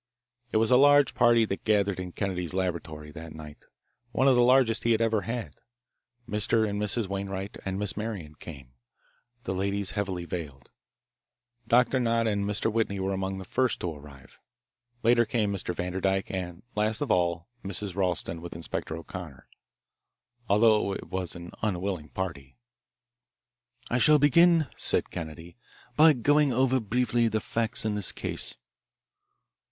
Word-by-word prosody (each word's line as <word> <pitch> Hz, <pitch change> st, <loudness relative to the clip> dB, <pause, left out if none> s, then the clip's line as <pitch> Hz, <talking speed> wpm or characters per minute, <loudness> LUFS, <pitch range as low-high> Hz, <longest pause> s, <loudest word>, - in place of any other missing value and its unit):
It -, -, +2 dB
was 110 Hz, +1 st, +2 dB
a 125 Hz, -, +7 dB
large 145 Hz, +1 st, +5 dB
party 120 Hz, -2 st, +4 dB
that 95 Hz, -2 st, -4 dB
gathered 100 Hz, -3 st, +1 dB
in 90 Hz, -1 st, -5 dB
Kennedy's 90 Hz, -4 st, -3 dB
laboratory 80 Hz, -5 st, -3 dB
that 80 Hz, +1 st, -9 dB
night, 75 Hz, -1 st, -10 dB, 0.5 s
one 130 Hz, -, +2 dB
of 135 Hz, -, +6 dB
the 125 Hz, -, +4 dB
largest 125 Hz, -2 st, +4 dB
he 115 Hz, -, +3 dB
had 110 Hz, -, +1 dB
ever 115 Hz, -2 st, +1 dB
had. 115 Hz, +1 st, -5 dB, 0.7 s
Mr. 110 Hz, +1 st, +1 dB
and 105 Hz, 0 st, -3 dB
Mrs. 105 Hz, +1 st, 0 dB
Wainwright 100 Hz, 0 st, -5 dB
and 95 Hz, 0 st, -2 dB
Miss 105 Hz, 0 st, -3 dB
Marian 105 Hz, -8 st, -5 dB
came, 70 Hz, -5 st, -11 dB, 0.7 s
the 95 Hz, -, -3 dB
ladies 100 Hz, +1 st, -1 dB
heavily 95 Hz, -4 st, -3 dB
veiled. 75 Hz, -6 st, -7 dB, 1.0 s
Doctor 125 Hz, +3 st, +3 dB
Nott 115 Hz, -1 st, +1 dB
and 100 Hz, -2 st, 0 dB
Mr. 105 Hz, +2 st, -1 dB
Whitney 110 Hz, -3 st, 0 dB
were 95 Hz, +1 st, -1 dB
among 95 Hz, 0 st, -3 dB
the 95 Hz, -, -7 dB
first 130 Hz, +4 st, 0 dB
to 85 Hz, -2 st, -2 dB
arrive. 70 Hz, -2 st, -14 dB, 0.6 s
Later 120 Hz, +1 st, +5 dB
came 110 Hz, -3 st, 0 dB
Mr. 95 Hz, -2 st, -3 dB
Vanderdyke 95 Hz, +2 st, -1 dB
and 90 Hz, 0 st, -5 dB
last 110 Hz, +3 st, -1 dB
of 145 Hz, -, -1 dB
all 85 Hz, -1 st, +1 dB, 0.2 s
Mrs. 100 Hz, -1 st, -4 dB
Ralston 90 Hz, -3 st, -1 dB
with 85 Hz, -1 st, -8 dB
Inspector 80 Hz, -1 st, -4 dB
O'Connor. 80 Hz, -3 st, -9 dB, 1.0 s
Altogether 105 Hz, -1 st, +4 dB
it -, -, -12 dB
was 95 Hz, -2 st, -3 dB
an 85 Hz, 0 st, -9 dB
unwilling 95 Hz, -6 st, -2 dB
party. 70 Hz, -, -6 dB, 1.3 s
"I 120 Hz, -, +2 dB
shall 150 Hz, +3 st, +6 dB
begin," 165 Hz, +3 st, +5 dB
said -, -, +1 dB
Kennedy, 80 Hz, +1 st, -8 dB, 0.4 s
"by 155 Hz, +1 st, +7 dB
going 145 Hz, +3 st, +3 dB
over, 130 Hz, +1 st, +2 dB
briefly, 120 Hz, +1 st, +1 dB
the 110 Hz, -1 st, 0 dB
facts 115 Hz, +1 st, -1 dB
in 110 Hz, -, 0 dB
this 105 Hz, -3 st, 0 dB
case." -, -, -3 dB
100 Hz, 155 wpm, -27 LUFS, 90-115 Hz, 1.3 s, a